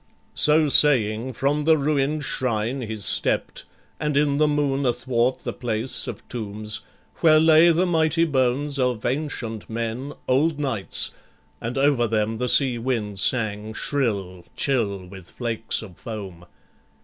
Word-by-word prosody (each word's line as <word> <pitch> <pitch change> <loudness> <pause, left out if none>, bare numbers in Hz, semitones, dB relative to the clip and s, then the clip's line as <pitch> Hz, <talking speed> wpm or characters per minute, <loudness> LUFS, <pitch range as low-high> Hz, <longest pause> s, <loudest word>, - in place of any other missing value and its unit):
So 150 +1 +4
saying, 130 -4 +4
from 145 +5 0
the 160 0 +5
ruin'd 145 +1 0
shrine 125 0 -1
he 110 -2 -4
stept, 105 - -1 0.3
And 150 -2 -1
in 145 -1 +2
the 155 - +4
moon 145 -2 0
athwart 125 0 0
the - - -4
place 115 +1 -2
of - - -8
tombs, 110 -2 -4 0.4
Where 155 -2 +5
lay 160 +1 +6
the 170 +2 +3
mighty 165 -1 +2
bones 140 0 0
of 125 -3 0
ancient 120 -5 -3
men, 115 +5 -4
Old 145 +4 +2
knights, 130 -9 -2 0.5
and 120 +3 -4
over 135 -4 +3
them 110 0 -1
the 125 +2 -1
sea 130 -3 +3
wind 110 -5 -2
sang 110 -2 0
Shrill, 100 -10 -2
chill, 105 -8 0
with 95 -1 -12
flakes 115 -2 -3
of 95 -6 -12
foam. 95 -6 -8
125 Hz, 140 wpm, -23 LUFS, 110-145 Hz, 0.5 s, lay